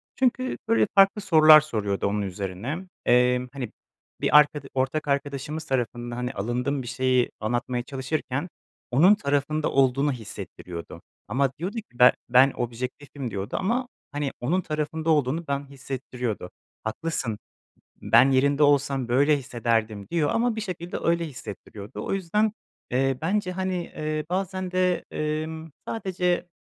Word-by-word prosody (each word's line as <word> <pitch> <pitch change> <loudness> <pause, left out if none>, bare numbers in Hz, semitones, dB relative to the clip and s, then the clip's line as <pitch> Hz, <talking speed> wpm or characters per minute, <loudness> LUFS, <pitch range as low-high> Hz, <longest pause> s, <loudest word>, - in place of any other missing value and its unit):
Çünkü, 255 0 +1
böyle, 230 -2 +3
farklı 195 +1 +5
sorular 155 -4 +8
soruyordu 105 -10 -1
onun 105 +1 0
üzerine 95 - -4
m 185 +2 -8 0.2
emm, 125 +1 +3
hani, 130 -6 -5 0.5
bir - - +6
arkada 145 -1 +4
ortak 135 +3 -1
arkadaşımız 140 +2 -2
tarafından, 120 -3 -2
hani, 125 +2 -3
alındığım 125 +7 -1
bir 120 - -8
şeyi 130 0 +1
anlatmaya 120 +2 -1
çalışırken 135 +3 -3 0.4
onun 175 +11 +6
tarafında 145 -2 0
olduğunu 135 +2 +3
hissettiriyordu. 90 -7 -8 0.3
Ama 135 +4 +1
diyordu 185 +6 -3
ki, 205 - -8
"Be 125 - +9 0.2
ben 130 +3 +6
objektifim." 125 +2 -5
diyordu 100 +1 -4
ama, 240 +6 0 0.2
hani, 145 -1 -2
onun 175 +9 +1
tarafında 155 +1 -3
olduğunu 155 +2 +2
ben 140 0 -2
hissettiriyordu. 125 -7 -5 0.3
"Haklısın, 115 -2 -2 0.6
ben 135 +2 +6
yerinde 140 +3 +3
olsam 140 -3 +3
böyle 145 +4 +4
hissederdim." 115 -5 -1
diyor 165 -4 +1
ama 230 -1 +1
bir - - -2
şekilde 180 -3 -5
öyle 170 0 +2
hissettiriyordu. 105 -5 -8
O - - -3
yüzden, 205 +3 +1 0.4
eee, 135 +1 +1
bence, 185 +1 0
hani, 185 0 -2
eee, 155 -1 -3
bazen 185 0 -2
de, 185 -1 +1
emm, 155 +1 -3 0.2
sadece, 180 -4 -1
140 Hz, 135 wpm, -25 LUFS, 125-165 Hz, 0.6 s, Be